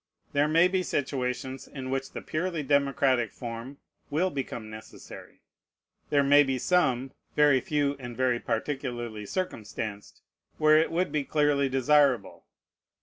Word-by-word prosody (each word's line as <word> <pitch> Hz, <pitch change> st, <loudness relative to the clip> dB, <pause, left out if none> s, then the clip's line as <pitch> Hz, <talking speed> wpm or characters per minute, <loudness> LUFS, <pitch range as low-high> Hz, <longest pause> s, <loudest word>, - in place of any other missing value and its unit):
There 145 Hz, +1 st, +3 dB
may 165 Hz, +3 st, +5 dB
be 185 Hz, 0 st, 0 dB
situations 130 Hz, -4 st, -3 dB
in 130 Hz, -2 st, -7 dB
which 135 Hz, 0 st, -2 dB
the -, -, -7 dB
purely 165 Hz, -1 st, -2 dB
democratic 135 Hz, -4 st, +2 dB
form 120 Hz, +3 st, -7 dB, 0.3 s
will 180 Hz, +6 st, +1 dB
become 125 Hz, -5 st, -5 dB
necessary. 110 Hz, 0 st, -12 dB, 0.7 s
There 145 Hz, -1 st, +3 dB
may 145 Hz, +1 st, +6 dB
be 135 Hz, -2 st, 0 dB
some 130 Hz, -5 st, +1 dB, 0.2 s
(very 145 Hz, -3 st, +5 dB
few, 145 Hz, 0 st, 0 dB
and 120 Hz, -2 st, -8 dB
very 125 Hz, -2 st, +1 dB
particularly 120 Hz, -5 st, -4 dB
circumstanced) 110 Hz, -, -5 dB, 0.3 s
where 155 Hz, 0 st, +5 dB
it 160 Hz, -, +1 dB
would 180 Hz, +3 st, 0 dB
be 150 Hz, -2 st, 0 dB
clearly 145 Hz, -1 st, +1 dB
desirable. 135 Hz, 0 st, +2 dB
135 Hz, 135 wpm, -28 LUFS, 125-150 Hz, 0.7 s, may